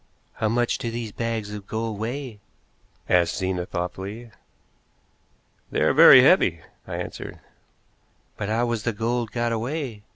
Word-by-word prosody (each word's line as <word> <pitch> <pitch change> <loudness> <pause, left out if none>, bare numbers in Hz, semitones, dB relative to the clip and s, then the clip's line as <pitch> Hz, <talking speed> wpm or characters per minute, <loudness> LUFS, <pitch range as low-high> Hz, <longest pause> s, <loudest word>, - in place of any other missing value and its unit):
"How 110 - -1
much 120 +1 0
do 115 - -3
these 115 -2 -5
bags 115 -2 -3
of 100 -2 -8
gold 110 -1 -3
weigh?" 120 0 -5 0.7
asked 85 -2 +2
Zena 95 -2 -2
thoughtfully. 95 +6 -5 1.4
"They - - -1
are - - +3
very - - +9
heavy," - - +4 0.3
I - - -5
answered. - - -6 1.0
"But 100 - -4
how 115 +2 +1
was 120 -2 -2
the 115 +2 -1
gold 115 +2 -1
got 120 -1 -1
away?" 120 0 -3
110 Hz, 140 wpm, -24 LUFS, 105-120 Hz, 1.4 s, very